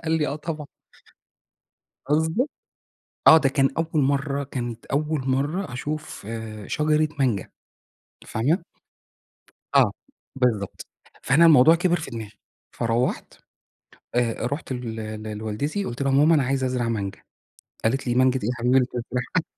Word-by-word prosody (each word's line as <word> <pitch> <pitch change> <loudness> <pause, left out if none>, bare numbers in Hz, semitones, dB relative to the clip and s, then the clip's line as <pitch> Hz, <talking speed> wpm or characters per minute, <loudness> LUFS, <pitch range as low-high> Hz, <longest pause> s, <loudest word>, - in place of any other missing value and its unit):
قال 160 - 0
لي: 155 -2 +2
"آه 145 - -3
طبعًا." 155 -2 -5 1.4
قصدي 160 - +1 0.8
آه 160 - +10
ده 135 -4 +2
كان 135 0 +2
أول 160 -3 +1
مرة 140 +1 0
كانت 120 -4 -5
أول 150 +1 -1
مرة 145 +4 -1
أشوف 150 -4 -5 0.4
شجرة 155 0 +2
مانجا 120 -8 0 0.8
فاهمة؟ 155 - 0 1.1
آه، - - +6 0.4
بالضبط 115 -7 -1 0.4
فأنا 155 +6 +5
الموضوع 160 0 +7
كبر 175 +1 +2
في 145 - -7
دماغي، 110 -3 -6 0.4
فروّحت 115 +2 -1 0.8
آآ، 120 -1 0
روحت 140 0 -4
ل 110 -3 -5 0.2
لوالدتي 125 - -2
قلت 120 -2 -4
لها: 135 - +1
"ماما 150 +4 +5
أنا 150 - +3
عايزة 130 +1 0
أزرع 125 -2 -1
مانجا،" 100 -3 -3 0.6
قالت 130 +5 +1
لي: 120 - +1
"مانجا 130 +1 +3
ايه 105 - -1
يا 125 - 0
حبيبي 125 +1 +2
اللي 125 -2 +4
تزرعها." 125 +7 -3
135 Hz, 135 wpm, -24 LUFS, 120-155 Hz, 1.4 s, آه